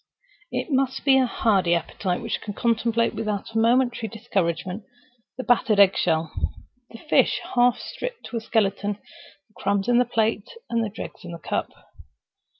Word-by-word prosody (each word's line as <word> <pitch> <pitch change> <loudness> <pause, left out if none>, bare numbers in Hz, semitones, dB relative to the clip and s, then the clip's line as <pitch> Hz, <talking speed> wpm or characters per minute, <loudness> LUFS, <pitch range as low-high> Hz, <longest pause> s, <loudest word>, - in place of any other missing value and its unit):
It - - -3
must 265 0 0
be 265 -1 +6
a 260 - +3
hardy 195 -7 +2
appetite 180 +2 -2
which - - -3
can 205 -2 -6
contemplate 230 0 +1
without 210 -1 -3
a 225 - +1
momentary 240 0 +2
discouragement 190 -3 -2 0.5
the 255 - -3
battered 225 -4 +3
egg 195 -1 +7
shell, 160 -2 0 0.6
the 230 - -11
fish 300 - +2
half 245 -1 +4
stripped - - -6
to 240 - -4
a - - -3
skeleton, 205 -2 0 0.5
the 215 - -33
crumbs 200 0 0
in 245 0 +4
the 250 - +4
plate, 225 -3 0 0.2
and 230 -1 +1
the 215 - -2
dregs 215 0 -8
in 175 -1 -7
the - - -6
cup. 165 - -3
225 Hz, 165 wpm, -24 LUFS, 195-240 Hz, 0.6 s, egg